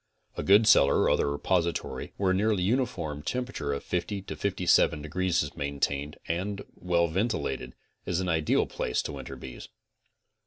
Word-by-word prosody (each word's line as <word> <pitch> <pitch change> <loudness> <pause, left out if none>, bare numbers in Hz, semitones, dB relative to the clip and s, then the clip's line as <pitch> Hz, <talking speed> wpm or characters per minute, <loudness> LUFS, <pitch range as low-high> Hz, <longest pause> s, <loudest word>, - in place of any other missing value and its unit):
A. - - -3
good 100 +8 +5
cellar 70 -10 +5
or - - +3
other 70 - +2
repository 85 +4 -1
where 95 -2 +2
a - - +3
nearly 100 -1 +1
uniform 90 - -1
tempera 125 +10 -3
ture 70 0 -2
of 70 - -4
50 95 +2 -2
to - - -6
57 90 -6 +2
degrees 85 +3 0
is 75 - -7
maintained, 70 0 -2
and 95 +4 -2
well 85 -1 +1
ventilated, 80 - -2 0.3
is 90 - 0
an 95 - -2
ideal 80 -3 +2
place 60 - -2
to - - -4
winter - - -7
bees. 65 -2 -9
85 Hz, 165 wpm, -28 LUFS, 75-100 Hz, 0.3 s, good